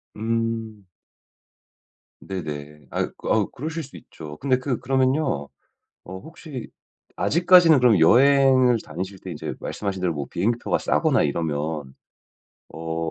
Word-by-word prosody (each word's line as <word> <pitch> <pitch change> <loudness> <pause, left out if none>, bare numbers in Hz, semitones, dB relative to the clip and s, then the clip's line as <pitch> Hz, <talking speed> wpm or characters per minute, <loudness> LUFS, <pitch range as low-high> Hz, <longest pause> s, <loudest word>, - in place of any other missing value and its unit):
음. 115 -1 -3 1.3
네네. 75 -5 -7
아이 - - -1
그 - - -6
아우 - - +2
그러실 160 +4 -5
수 135 - -12
있죠. 75 -2 -11
근데 130 -2 +1
그 130 -2 -2
그러면요. 130 - 0 0.6
어 95 - -7
혹시 150 - -9 0.5
아직까지는 170 -2 +5
그럼 120 -6 +4
여행을 130 +5 +5
다니실 95 +5 -6
때 - - -8
인제 - - -5
말씀하신 100 -2 -4
대로 90 -2 0
뭐 70 -2 -4
비행기표가 115 +7 0
싸거나 - - +2
이러면 75 -2 -3 0.8
어 80 0 -3
110 Hz, 270 characters per minute, -23 LUFS, 80-130 Hz, 1.3 s, 아직까지는